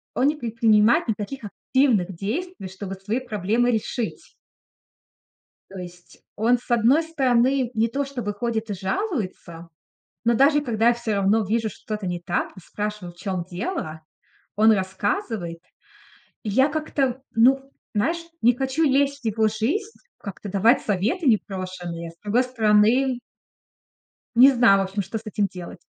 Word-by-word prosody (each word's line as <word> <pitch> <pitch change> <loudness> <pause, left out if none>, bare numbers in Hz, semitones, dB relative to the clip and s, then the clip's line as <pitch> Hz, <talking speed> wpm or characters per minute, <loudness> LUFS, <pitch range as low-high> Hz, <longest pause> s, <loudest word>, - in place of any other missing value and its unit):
он 260 - +3
не 300 - +2
предпринимает 230 -3 +3
никаких 225 +4 -4
активных 210 -4 +1
действий, 240 - -4
чтобы 190 +1 -7
свои 205 +6 -2
проблемы 235 0 0
решить. 225 +1 -3 1.4
То 195 - -10
есть 175 -1 -11 0.2
он, 235 +4 +3
с 245 - -19
одной 240 +7 +4
стороны, 260 -4 +1
не 225 +1 +2
то 280 +4 -2
что 275 -2 -6
бы 205 -2 -3
ходит 225 +1 -3
и 205 - -1
жалуется, 190 - -4 0.5
но 235 - +3
даже 290 +4 +4
когда 230 -3 +2
я - - +4
всё 235 -2 -3
равно 200 +3 +2
вижу, 220 +2 0
что-то 215 -1 -6
не 175 -1 -2
так, 175 +1 -2
и - - -11
спрашиваю, 205 -1 -5
в - - -27
чём 185 -1 -3
дело, 175 - -4 0.5
он 220 +2 +5
рассказывает. 190 - -2 0.8
И 215 - -5
я 265 +7 +4
как-то, 275 -4 -1
ну, 270 +4 +4 0.2
знаешь, 325 +12 0 0.2
не 240 +2 +5
хочу 265 +4 0
лезть 280 0 +2
в 245 - -25
его 220 0 +2
жизнь, 295 - -2 0.2
как-то 200 0 -8
давать 210 +6 +4
советы 215 - -1
непрошеные. 185 -6 -2
С - - -27
другой 225 +5 +2
стороны 240 +2 +3 1.2
не 260 +3 +8
знаю, 235 -6 +5
в - - +2
общем, 195 +2 -3
что 195 +4 -5
с - - -7
этим 210 -1 0
делать. 175 -2 -10
225 Hz, 155 wpm, -24 LUFS, 195-260 Hz, 1.4 s, не